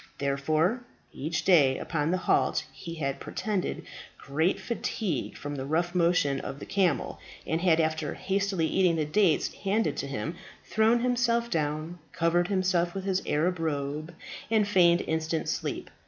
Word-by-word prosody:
Therefore, 155 - +1 0.3
each 160 +4 -3
day 145 -8 +5
upon 155 -2 -1
the 185 - +2
halt 185 - +1
he 165 -1 -8
had 135 -4 -2
pretended 205 -4 -3 0.3
great 160 +6 0
fatigue 205 - -3
from 145 0 -5
the 135 -2 -4
rough 170 +3 0
motion 170 -6 +2
of 135 - -6
the - - -8
camel, 180 -8 0 0.3
and 160 +1 -1
had, 170 -3 +4
after 155 -1 0
hastily 195 -3 0
eating 175 +1 +2
the 155 -2 0
dates 170 +2 +2
handed 195 -6 0
to - - -3
him, 140 +6 -4 0.3
thrown 220 +2 +3
himself 235 -1 +1
down, 155 +2 -2
covered 170 +1 +2
himself 185 -2 +1
with 195 - -3
his 190 -1 0
Arab 170 +4 +1
robe, 155 +1 -3 0.3
and 215 -2 +3
feigned 175 -3 +5
instant 160 0 -2
sleep. - - -3
170 Hz, 155 wpm, -28 LUFS, 155-190 Hz, 0.3 s, day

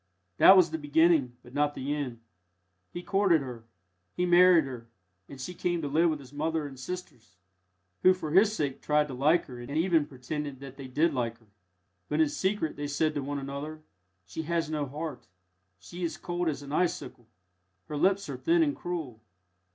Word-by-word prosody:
That 190 - +9
was 175 -4 +5
the 160 - -3
beginning, 145 -4 +3
but 120 - -15
not 145 +1 +1
the 140 +3 -2
end. 130 -6 -4 0.7
He 175 - -6
courted 195 -5 +3
her 120 -4 -8 0.5
he 180 - +1
married 175 -1 +6
her 120 -3 -8 0.4
and 140 - -10
she 135 +7 -5
came 175 0 -1
to - - -1
live 160 +4 +3
with 155 - -1
his 135 -1 -14
mother 160 +1 -1
and 135 -2 -9
sisters, 125 - -8 0.6
who 185 0 +6
for 155 -5 -5
his 200 +5 +5
sake 140 -6 -2
tried 150 0 +2
to - - -5
like 150 +7 +3
her 125 -3 -10
and 120 - -9
even 165 -3 +2
pretended 140 +1 -5
that 135 -1 -10
they 135 -2 -8
did 155 +5 +1
like 115 -3 -2
her. 115 -3 -28 0.6
But 150 - 0
in 160 -2 +4
secret 190 0 -1
they 145 0 -3
said 155 +2 0
to 145 - -2
one 140 +1 -3
another, 140 +3 -6 0.4
"She 95 - -5
has 165 0 -1
no 150 -2 -1
heart; 150 +4 -6 0.5
she 175 - -9
is 170 - -2
cold 175 -1 -2
as 145 -2 -4
an 140 - -9
icicle; 150 -7 -2 0.6
her 150 - -5
lips 195 +6 +2
are - - -5
thin 335 0 +3
and 290 -2 0
cruel. 155 -11 -5
150 Hz, 195 wpm, -29 LUFS, 135-170 Hz, 0.7 s, That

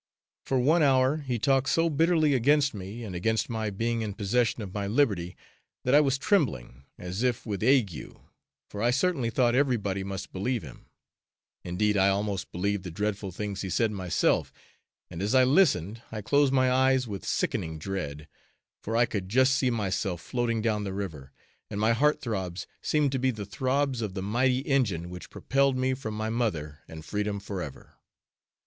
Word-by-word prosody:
For 135 - 0
one 150 +7 +3
hour, 135 0 +4
he 130 -5 -3
talked 135 +4 +2
so 165 0 +3
bitterly 160 -1 +3
against 140 +3 +3
me 100 +4 -7
and 100 -5 -6
against 110 +6 0
my 110 -2 -2
being 115 +3 -1
in 105 -3 -4
possession 110 +2 0
of 95 -2 -8
my 100 -1 -2
liberty 100 - 0 0.5
that 125 - +1
I 145 - +8
was 135 -2 +1
trembling, 95 - 0
as 90 +4 -5
if 125 -2 0
with 105 -4 -3
ague, 115 - +1 0.5
for 105 - -7
I 120 - +3
certainly 140 -2 +1
thought 120 0 +2
everybody 115 -8 +1
must 95 0 -6
believe 115 +5 -1
him; - - -12 0.8
indeed 105 +4 0
I 95 0 +4
almost 100 -1 -2
believed 100 +2 -1
the 90 - -5
dreadful 105 +2 -3
things 100 +1 -4
he 95 - -4
said, 115 +3 +1
myself, 95 -4 0 0.6
and 85 0 -6
as 105 +6 0
I 130 - +7
listened 130 - +2
I 110 -2 -5
closed 140 +4 +3
my 130 -1 +3
eyes 130 0 +3
with 100 -3 -6
sickening 80 -1 -1
dread, 75 -4 -5 0.5
for 115 +2 -2
I 120 - +5
could 100 -5 -4
just 130 +4 +4
see 130 -2 +2
myself 100 -5 -1
floating 115 +2 -1
down 105 -2 0
the 100 -2 -4
river, 80 -9 -6 0.4
and 105 - -4
my 110 +2 +3
heart 150 +6 +2
throbs 95 -6 -3 0.2
seemed 150 -3 +1
to 135 - -1
be 130 +1 +2
the 110 -5 -4
throbs 130 +4 -1
of 105 -4 -4
the 95 - -3
mighty 125 +5 +1
engine 105 - 0
which 90 0 -9
propelled 135 0 +1
me 130 0 +1
from 110 -5 -5
my 110 +1 -2
mother 80 -11 -2
and 80 -1 -10
freedom 105 +1 -2
forever! 95 -8 -7
110 Hz, 180 wpm, -28 LUFS, 95-130 Hz, 0.8 s, I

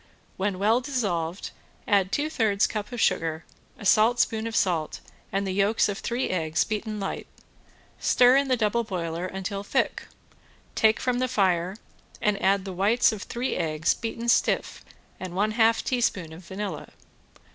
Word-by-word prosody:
When 195 0 -1
well 220 +6 +3
dissolved 200 - -2 0.4
add 195 -3 +2
two 290 +6 0
thirds 215 -9 +1
cup 210 +1 -4
of 245 - -5
sugar, 165 -5 0 0.3
a 210 - -10
saltspoon 220 +1 +3
of 225 - -5
salt, 170 -7 0 0.3
and 195 +1 -1
the 190 - -2
yolks 200 +3 +2
of 205 -1 -3
three 240 +2 -2
eggs 160 -3 +1
beaten 215 0 -4
light, 195 - -4 0.7
stir 250 +1 +5
in 275 0 +3
the 255 -1 +2
double 225 +1 +1
boiler 175 -3 -4
till 195 +1 -3
thick, - - -1 0.7
take 220 0 +3
from 250 -1 0
the 255 - +1
fire, 185 -5 +1 0.4
and 210 -1 0
add 195 0 +2
the 190 - -5
white 205 +7 +3
of 215 -3 -6
three 245 +4 -3
eggs 155 -2 +1
beaten 230 +1 -5
stiff 235 - +1 0.4
and 185 -1 -6
one 210 +3 +1
half 225 0 +3
teaspoon 200 -10 -1
of 170 +3 -11
vanilla. 200 +3 -5
205 Hz, 160 wpm, -26 LUFS, 185-230 Hz, 0.7 s, stir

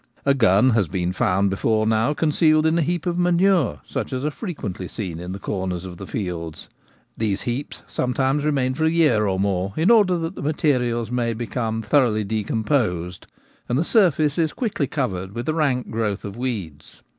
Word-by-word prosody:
A 140 - +5
gun 115 -1 +4
has 110 -5 +2
been 90 +2 -2
found 95 +2 +1
before 110 +3 +1
now 110 +6 +2
concealed 155 0 +3
in 160 +1 +3
a - - +3
heap 175 +3 -1
of 175 0 -1
manure, 175 - +2
such - - -4
as 130 +2 -2
are 150 - 0
frequently 125 - -5
seen 90 -5 -5
in 90 +1 -6
the 95 - -4
corners 95 -2 -3
of 90 -2 -8
the 95 - -8
fields. 85 -5 -5 0.5
These 105 -3 -1
heaps 125 +4 -4
sometimes 135 +3 0
remain 135 -4 +1
for 160 +4 0
a - - +4
year 155 -11 +3
or 95 -1 0
more 95 -1 0
in 165 +8 +4
order 200 -6 +5
that 165 +1 -3
the - - -8
materials 125 -6 0
may 120 -2 0
become 115 -1 -3
thoroughly 120 -7 +2
decomposed, 105 - -1 0.4
and 120 - +1
the 155 - +2
surface 165 - +2
is 160 -2 +1
quickly 205 - -1
covered 95 -10 -3
with 120 +1 -4
a 155 - +1
rank 140 -6 0
growth 110 -3 -2
of 100 -1 -6
weeds. 105 - -5
120 Hz, 190 wpm, -22 LUFS, 100-150 Hz, 0.5 s, A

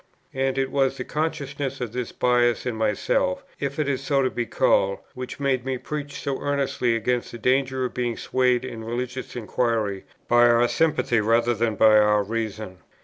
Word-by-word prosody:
And 135 0 -1
it 135 0 0
was 135 -1 +1
the - - -3
consciousness 145 -3 -3
of 120 -4 -4
this 125 -2 -3
bias 120 -1 +2
in 125 -3 -2
myself, 105 -4 0 0.2
if 140 +1 -3
it 155 -2 0
is 135 -1 -1
so 135 0 +2
to 130 - 0
be 120 -1 -3
called, 100 -1 +2 0.2
which 125 +2 -7
made 135 -3 0
me 130 0 -2
preach 145 +2 -5
so 140 -1 -3
earnestly 140 -4 0
against 120 +1 -1
the 120 - -7
danger 130 +2 +1
of 125 - -4
being 120 -2 -2
swayed 125 -1 +1
in 115 -3 -7
religious 125 +3 -5
inquiry 110 -4 -1 0.2
by 120 0 +5
our 120 +1 +4
sympathy 145 -5 +1
rather 115 +2 +2
than 115 -1 0
by 110 +1 +6
our 105 -1 +3
reason. 110 -3 -4
125 Hz, 185 wpm, -24 LUFS, 115-135 Hz, 0.2 s, by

